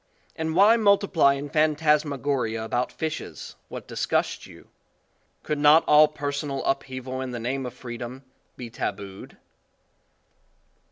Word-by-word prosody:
And 160 0 -3
why 210 +5 +6
multiply 200 -9 +3
in 140 +1 -5
phantasmagoria 145 -6 +1
about 120 +3 -1
fishes, 160 -1 -6
what - - -8
disgusts - - -1
you? - - -16 0.7
Could 150 -1 -2
not 150 +2 +6
all 150 +1 +7
personal 145 -2 -4
upheaval 130 -1 -3
in 130 - -4
the 120 -1 -5
name 130 +3 -3
of 125 - -9
freedom, 125 +1 -8 0.3
be 120 -2 -8
tabood? 100 -3 -6
140 Hz, 120 wpm, -25 LUFS, 125-155 Hz, 0.7 s, all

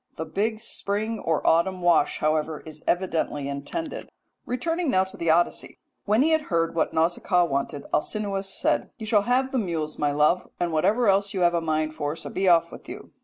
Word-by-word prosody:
The 160 - -4
big 215 +7 -2
spring 215 0 -2
or 160 -2 -1
autumn 180 +3 +2
wash, 170 -4 +3
however, 155 0 0
is 155 -1 -11
evidently 165 -5 0
intended. 140 - -5 0.4
Returning 330 +6 -1
now 185 -5 +3
to 190 - -10
the 170 - -2
Odyssey, 170 +2 +1 0.3
when 215 +5 +3
he 320 - +2
had 315 -1 +1
heard 165 -1 +1
what 165 - 0
Nausicaa 175 +2 +2
wanted 140 -1 -3
Alcinous 195 +2 -1
said: - - 0
"'You 220 - -7
shall 215 -2 +3
have 260 +1 +2
the 265 - +1
mules, 165 -7 -3
my 145 - +2
love, 150 +5 +2
and 175 -1 0
whatever 210 +9 +2
else 200 0 +2
you 185 - -1
have 175 0 +4
a 170 - +1
mind 155 -1 -1
for, 145 0 -3
so - - -7
be 190 0 +1
off 170 -2 +4
with - - -11
you.' - - -9
175 Hz, 200 wpm, -25 LUFS, 155-210 Hz, 0.4 s, have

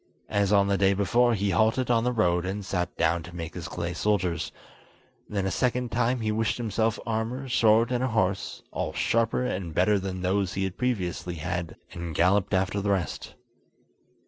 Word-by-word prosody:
As 100 -1 +2
on 100 -1 +5
the 100 -1 +1
day 100 0 +4
before, 120 +5 +3
he 100 -1 0
halted 115 +4 +2
on 115 -1 +3
the 125 - +1
road, 90 -7 +2
and 95 +2 -4
sat 90 -3 -2
down 85 +1 +2
to 90 +2 -11
make 85 -1 -5
his 90 -1 -6
clay 85 0 -4
soldiers; 90 -2 0 0.8
then 100 -2 -1
a 95 - 0
second 125 -1 0
time 120 +1 +1
he 110 -1 0
wished 110 +1 0
himself 110 -1 0
armour, 115 +4 -2
sword, 115 -1 +4
and 125 0 0
a - - +2
horse, 100 -5 -1
all - - -3
sharper 115 +2 +1
and 90 -7 -3
better 100 +3 +3
than 95 -1 -4
those 95 0 0
he 95 - -1
had 95 -1 -3
previously 90 -8 -2
had, 85 0 -4 0.2
and 85 -2 -6
galloped 95 +4 +3
after 95 +2 0
the 100 - -1
rest. 95 -7 -2
100 Hz, 190 wpm, -27 LUFS, 90-115 Hz, 0.8 s, on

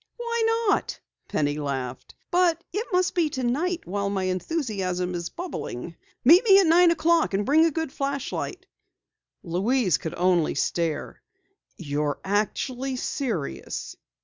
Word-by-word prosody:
"Why 465 -1 0
not?" - - -1 0.3
Penny 145 0 -1
laughed. 130 -3 -4 0.2
"But 345 -2 +2
it 435 +4 -2
must 365 0 +2
be 335 -4 +2
tonight 295 +8 -1
while 200 +2 -2
my 195 -1 -1
enthusiasm 185 - -2
is 170 -1 -4
bubbling. 170 - -6 0.3
Meet 340 - +8
me 395 -4 +7
at 390 - +4
nine 340 +2 +6
o'clock 330 -7 +2
and 200 +1 0
bring 315 +6 +5
a - - +4
good 320 -2 -3
flashlight." 280 +7 -3 0.8
Louise 190 - +1
could 160 - -5
only 175 -3 +2
stare. 160 0 -2 0.6
"You're 145 -2 -2
actually 245 +6 -1
serious!" 245 - -4
255 Hz, 130 wpm, -25 LUFS, -, 0.8 s, Meet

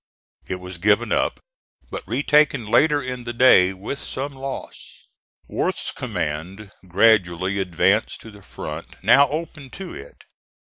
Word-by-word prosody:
It 95 - -2
was 90 -1 -8
given 105 +5 +2
up, - - 0 0.5
but - - -6
retaken 145 -3 +2
later 145 +6 +3
in 125 -1 -5
the 120 0 -5
day, 115 -7 +6
with 100 +9 -6
some 140 +2 -5
loss. 135 0 -8 0.4
Worth's - - -2
command 90 +7 -5 0.2
gradually 95 -1 +2
advanced 95 +3 +1
to 110 - -11
the 100 -1 -15
front - - -8
now 140 +1 +6
open 155 -3 -6
to 190 -1 -7
it. - - -12
110 Hz, 135 wpm, -22 LUFS, 95-135 Hz, 0.5 s, day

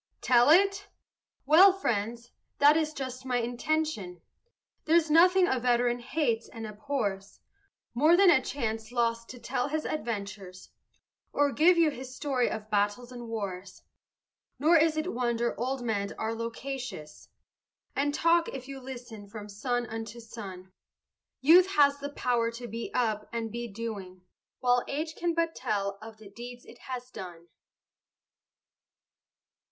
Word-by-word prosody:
Tell 245 +1 +5
it? 395 +4 +4 0.6
Well, 340 +8 +8
friends, 235 - -2 0.3
that 290 +1 +6
is 315 -1 +1
just 260 -3 -6
my 255 -2 0
intention; 245 - -2 0.7
There's 320 -1 +3
nothing 360 +3 +6
a 260 - +1
veteran 245 0 +2
hates 240 -3 -1
and 225 -1 -7
abhors 210 -3 -4 0.5
More 305 +8 +5
than 385 -2 +7
a 265 - +4
chance 225 -4 -4
lost 230 -1 0
to 250 - -9
tell 250 +1 -2
his 310 +2 -2
adventures, 200 -8 -5 0.6
Or 285 0 +2
give 340 +5 +4
you 330 -2 +4
his 260 -1 -9
story 265 -3 0
of 215 0 -5
battles 205 +4 0
and 240 -1 -8
wars. 195 -4 -6 0.7
Nor 310 +6 +4
is 315 -1 +4
it 310 +4 -2
wonder 235 -1 0
old 255 +1 -2
men 205 -4 -2
are 220 +1 -2
loquacious, 230 - -6 0.7
And 285 +1 +1
talk, 335 +3 +2
if 260 -1 -7
you 275 -1 -7
listen, 245 -5 -9
from 210 0 -9
sun 245 +4 -2
unto 225 +1 -7
sun; 195 -5 -9 0.7
Youth 345 +7 +7
has 285 -2 +4
the 285 0 -5
power 240 -4 0
to 240 +1 -7
be 230 0 -5
up 220 -4 0
and 230 -1 -3
be 235 +1 -4
doing, 200 -4 -7 0.4
While 245 -1 +3
age 310 +3 -3
can 340 -1 -1
but 330 -1 0
tell 200 -1 -2
of 220 0 -10
the 215 -1 -13
deeds 245 +3 -10
it 240 - -15
has 255 -1 -6
done. 175 -5 -9
245 Hz, 145 wpm, -29 LUFS, 220-285 Hz, 0.7 s, Well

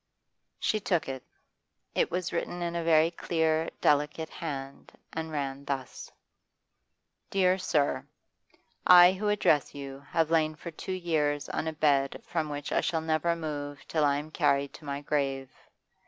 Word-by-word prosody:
She 215 - +1
took 180 -5 0
it. 130 -1 -4 0.7
It - - +1
was 180 +1 -2
written 175 +1 -2
in 170 0 -2
a 170 - -1
very 165 0 +4
clear, 160 -1 0
delicate 150 +2 +2
hand, 140 -5 -6 0.2
and 160 0 -4
ran 140 -2 -3
thus: 135 -2 -5 1.2
'DEAR 190 -1 +3
SIR, 150 -5 0 0.8
I 180 0 +9
who 205 +2 -1
address 155 -10 +2
you 135 -1 -7
have 165 -1 +1
lain 155 -1 +2
for 170 +2 -8
two 165 - -7
years 150 -5 0
on 160 - -2
a 160 - -2
bed 140 -3 +1
from 160 -3 -2
which 145 -1 -5
I - - +2
shall 165 -1 0
never 160 +1 +1
move 145 -3 -5
till 155 -2 +1
I 140 -1 +3
am 150 +2 -6
carried 140 -2 +1
to 155 - -12
my 140 0 -3
grave. 135 -2 -1
155 Hz, 155 wpm, -29 LUFS, 145-170 Hz, 1.2 s, I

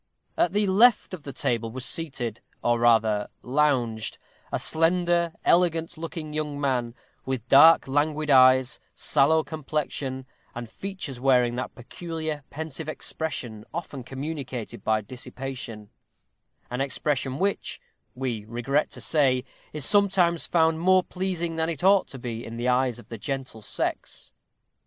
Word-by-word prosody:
At 175 - +2
the 210 0 +2
left 210 +3 +4
of 180 - -6
the 145 - -7
table 115 -3 -1
was 130 +2 -3
seated, 130 -8 -2 0.2
or 120 0 +2
rather 110 -3 +3 0.2
lounged, 125 -6 0 0.3
a - - 0
slender, 170 +1 +2
elegant 170 -1 +3
looking 160 -1 -6
young 150 -2 -3
man, 125 -4 -1 0.3
with 130 -3 -4
dark, 150 +5 +7
languid 150 +2 0
eyes, 130 +1 +5 0.2
sallow 155 +2 +3
complexion, 145 -3 -4 0.3
and 120 0 -5
features 185 - -6
wearing 125 -2 +3
that 130 - -4
peculiarly 155 +4 -5
pensive 160 +1 -5
expression 140 -9 -4
often 155 -6 -5
communicated 135 -3 -6
by 110 0 +1
dissipation; 120 -1 -7 0.8
an 125 +2 -2
expression 135 -1 -1
which, 195 +4 -1 0.4
we 125 -5 -3
regret 120 +6 0
to - - -8
say, 130 -5 +2 0.3
is 150 -3 -1
sometimes 190 -5 +3
found 160 -1 +2
more 185 +2 +4
pleasing 175 -3 -3
than 160 0 0
it 165 -1 -4
ought 195 0 +5
to 135 - -9
be 120 -2 -5
in 115 0 -7
the 120 +1 -2
eyes 125 -1 +2
of 120 - -14
the 115 - -7
gentle 130 -3 -4
sex. - - -3
140 Hz, 140 wpm, -26 LUFS, 125-165 Hz, 0.8 s, dark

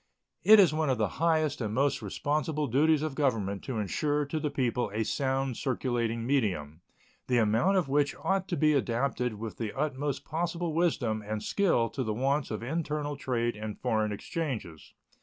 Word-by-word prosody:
It 215 0 +8
is 180 -7 +6
one 155 -2 0
of 130 - +2
the - - +1
highest 155 -4 +2
and 110 -1 -2
most 135 0 +1
responsible 150 - -1
duties 150 +4 +3
of 155 -3 -2
Government 110 -9 0
to 130 -4 -3
insure 145 - 0
to 155 +3 -3
the 150 -1 -1
people 125 -3 0
a 110 +2 -1
sound 135 0 -1
circulating 120 -3 -1
medium, 90 - -1 0.5
the 125 - +2
amount 115 - +3
of 175 -6 +1
which 145 +1 +1
ought 190 -1 -1
to 175 - -2
be 155 -1 +4
adapted 125 -2 0
with 110 +1 -7
the 110 0 -4
utmost 140 -1 -2
possible 170 0 -2
wisdom 135 -10 +1
and 105 +1 -4
skill 175 - +2
to 130 - -3
the 110 -2 -2
wants 135 +4 0
of 110 0 -4
internal 150 +1 -2
trade 120 -4 -1
and 110 0 -6
foreign 110 -1 0
exchanges. 105 - -5
135 Hz, 175 wpm, -29 LUFS, 115-150 Hz, 0.5 s, It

